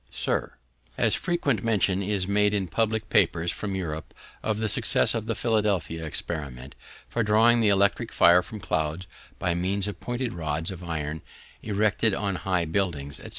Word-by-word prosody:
Sir, - - -2 0.4
As - - +2
frequent 145 - 0
mention 100 -4 +2
is 100 -1 -1
made 105 +1 +3
in 95 -2 -1
public 110 +2 0
papers 85 0 +3
from 100 -2 -4
Europe 80 -5 -5 0.3
of 110 -1 -1
the 110 0 0
success - - +2
of 110 -1 -3
the 115 - -1
Philadelphia 105 -8 0
experiment 70 -4 -5 0.3
for 120 - -1
drawing 115 +2 +4
the 110 - +4
electric 100 0 +2
fire 85 +1 +6
from 105 +4 -9
clouds 80 0 -2 0.3
by 85 - 0
means 95 +3 -1
of 105 - -5
pointed 120 0 -3
rods 80 0 -2
of 90 -1 -8
iron 80 -2 -4 0.4
erected 105 0 +1
on 100 -2 -2
high 90 -3 0
buildings, 80 -5 -2
&c. - - -9
95 Hz, 165 wpm, -26 LUFS, 85-105 Hz, 0.4 s, fire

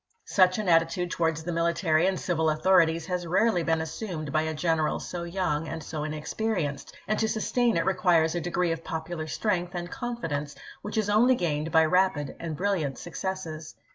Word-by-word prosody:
Such 185 -2 +4
an 215 -2 -2
attitude 170 +1 +2
towards 160 -1 0
the 175 - -3
military 170 0 +2
and 190 -1 0
civil 160 -3 +1
authorities 165 0 +3
has 180 -2 -3
rarely 185 +2 +2
been 160 -1 +1
assumed 160 -2 -5
by 155 - +2
a 160 0 -2
general 160 -1 +1
so 175 - -5
young 170 -3 -1
and 160 0 -5
so 155 -2 -4
inexperienced, 155 0 -3
and 215 - 0
to 220 - +1
sustain 235 +1 +1
it 165 - +1
re 190 - +2
quires 175 -4 +3
a 175 - -2
degi'ee 175 0 0
of 165 0 -7
popular 160 0 -4
strength 180 0 -1
and 175 0 -4
confidence 165 - -4 0.3
which 210 - -5
is 215 -2 +1
only 230 +5 +4
gained 160 -5 -1
by 160 0 +5
rapid 180 -4 +1
and 160 -3 -5
brilliant 170 -9 -1
suc 175 - -9
cesses. 165 -5 -5
170 Hz, 190 wpm, -27 LUFS, 160-190 Hz, 0.3 s, by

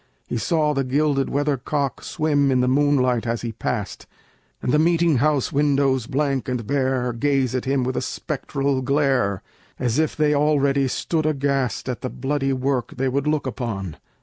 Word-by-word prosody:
He 120 - -3
saw 155 +2 +1
the 135 -1 0
gilded 140 +1 +1
weathercock 140 -1 -1
Swim 145 -3 +1
in 130 -1 +2
the 125 - +2
moonlight 130 -3 +2
as 115 0 -2
he 115 - -3
passed, 110 -2 -4 0.5
And - - -1
the 150 - +4
meeting 165 -2 +3
house 145 0 +1
windows, 140 -4 +2
blank 140 -2 -1
and 125 -3 -2
bare, 130 -1 0
Gaze 135 0 +1
at 130 0 -2
him 135 -1 +1
with 130 +1 -2
a - - 0
spectral 135 -1 -2
glare, 130 -7 +1 0.3
As 125 +2 0
if 160 - 0
they 150 -1 +2
already 140 -2 +2
stood 155 +4 -1
aghast 140 -5 -1
At 125 -2 -3
the 130 - -3
bloody 135 +1 -1
work 130 -1 -1
they 130 0 +1
would 140 +2 -1
look 150 -2 0
upon. 110 - -4
135 Hz, 175 wpm, -22 LUFS, 125-145 Hz, 0.5 s, the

